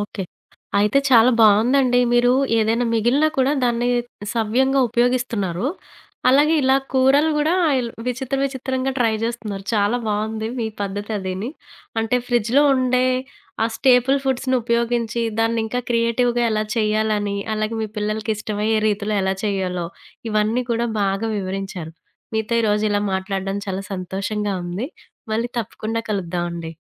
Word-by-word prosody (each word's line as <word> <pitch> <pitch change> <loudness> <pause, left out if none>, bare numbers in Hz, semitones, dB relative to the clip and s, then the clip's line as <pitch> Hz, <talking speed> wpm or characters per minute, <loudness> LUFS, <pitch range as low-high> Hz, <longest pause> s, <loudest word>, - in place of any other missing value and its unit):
Okay. 205 -2 -4 0.5
అయితే 210 +6 +3
చాలా 240 0 +7
బావుందండి. 245 +4 +4
మీరు 245 +1 +4 0.3
ఏదైనా 225 +2 +1
మిగిలినా 245 +8 +3
కూడా 265 +2 +3
దాన్ని 240 0 +1 0.5
సవ్యంగా 260 +5 +2
ఉపయోగిస్తున్నారు. 235 -5 0 0.6
అలాగే 290 +5 +5
ఇలా 265 +1 +4 0.2
కూరలు 270 +4 +4
గూడా 300 +2 +2 0.3
ఇల్ 240 -2 -2 0.2
విచిత్ర 265 +2 -2
విచిత్రంగా 265 -1 -2
ట్రై 230 -2 +2
జేస్తున్నారు. 220 -4 -4
చాలా 205 +3 +2
బావుంది 220 +1 -2
మీ 225 - -1
పద్ధతి 205 +2 -4
అదిని. 190 +4 -4 0.5
అంటే 225 +2 +1
ఫ్రిడ్జ్‌లో 240 +3 +3
ఉండే 255 -1 +2 0.6
ఆ - - +3
స్టేపుల్ 260 +1 +4
ఫుడ్స్‌నుపయోగించి 235 -3 0 0.2
దాన్ని 225 0 +1
ఇంకా 245 +3 -2
క్రియేటివ్‌గా 240 +1 +1
ఎలా 215 0 0
చేయాలని, 215 -2 0 0.2
అలాగే 215 +1 -2
మీ - - -1
పిల్లలకి 215 +1 -2
ఇష్టమయ్యే 215 +1 -1
రీతిలో 210 0 -1
ఎలా 190 0 0
చేయాలో, 185 -4 -1 0.4
ఇవన్నీ 215 +4 +1
కూడా 235 +1 +1 0.2
బాగా 195 +3 0
వివరించారు. 190 -4 -5 0.4
మీతో 220 +2 -1
ఈరోజు 210 0 +1
ఇలా 205 0 +1
మాట్లాడడం 195 +1 -2
చాలా 195 0 -3
సంతోషంగా 195 +2 -3
ఉంది. 185 +9 -4 0.4
మళ్ళీ 230 +2 0
తప్పకుండా 225 +1 -3
కలుద్దాం 175 -3 -2
అండి. 170 -1 -6
225 Hz, 130 wpm, -21 LUFS, 205-245 Hz, 0.6 s, చాలా